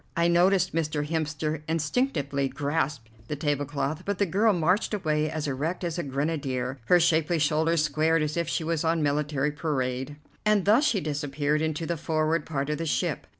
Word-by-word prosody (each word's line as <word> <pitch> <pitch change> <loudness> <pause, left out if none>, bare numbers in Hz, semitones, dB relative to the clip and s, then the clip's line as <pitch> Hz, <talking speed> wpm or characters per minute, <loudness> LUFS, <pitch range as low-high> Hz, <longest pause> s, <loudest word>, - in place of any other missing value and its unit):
I 170 0 +3
noticed 180 +2 +3
Mr. 150 -2 -1
Hemster 155 -1 -2
instinctively 150 - 0
grasp 145 -3 -2 0.2
the 150 - -3
tablecloth, 145 +1 -2
but 200 0 -2
the 200 - +2
girl 205 +5 +3
marched 185 +4 +1
away 155 -5 0
as 155 -1 -3
erect 150 +7 -2
as 170 -1 -2
a - - -1
grenadier, 135 -2 -2
her 180 +5 +5
shapely 165 0 +2
shoulders 160 +1 +2
squared 155 +2 +2
as 150 0 -2
if 170 -1 -1
she 165 - -1
was 165 0 -1
on 165 -1 +1
military 145 0 0
parade, 135 -3 -2 0.3
and 210 -3 +2
thus 225 +9 +5
she 210 -9 +2
disappeared 145 0 -1
into 160 0 -1
the 170 0 -2
forward 155 0 0
part 140 -1 -2
of 150 - -2
the 165 - -2
ship. - - -1
155 Hz, 180 wpm, -27 LUFS, 145-170 Hz, 0.3 s, her